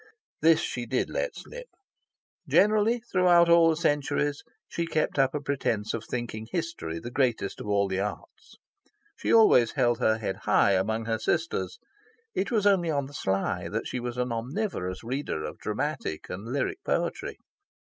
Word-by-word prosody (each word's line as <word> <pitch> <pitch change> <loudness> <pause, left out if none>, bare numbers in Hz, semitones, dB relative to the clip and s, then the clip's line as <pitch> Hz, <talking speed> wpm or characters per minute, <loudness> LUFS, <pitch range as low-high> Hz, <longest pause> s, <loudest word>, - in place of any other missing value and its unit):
This 160 0 +5
she 120 -1 -4
did 125 +2 -1
let - - -2
slip. - - -9 0.8
Generally, 215 +3 +3
throughout 180 -5 +4
all 170 -1 +6
the 160 - +2
centuries, 145 -2 0 0.3
she 170 0 -3
kept 155 -3 0
up 135 +1 +3
a - - 0
pretence 130 -7 -1
of 115 - -3
thinking 115 -3 -4
history 165 - -3
the 120 +9 -7
greatest 125 -3 0
of - - -7
all 100 -1 +2
the 95 0 -2
arts. 100 +1 -6 0.6
She - - -2
always 170 - +6
held 120 -1 +2
her 110 -3 +3
head 95 -4 -3
high 100 - +3
among 110 +4 0
her 110 0 -1
Sisters. 105 - -1 0.6
It 195 - -1
was 215 -4 +1
only 190 -4 +3
on 140 -3 0
the 140 - -12
sly 95 -7 -1
that - - -3
she 125 - -3
was 120 0 -5
an 125 -1 -1
omnivorous 115 - -3
reader 125 - -3
of 75 0 -6
dramatic 130 - -3
and 95 +4 -6
lyric 370 - -2
poetry. - - -2
130 Hz, 170 wpm, -27 LUFS, 110-170 Hz, 0.8 s, all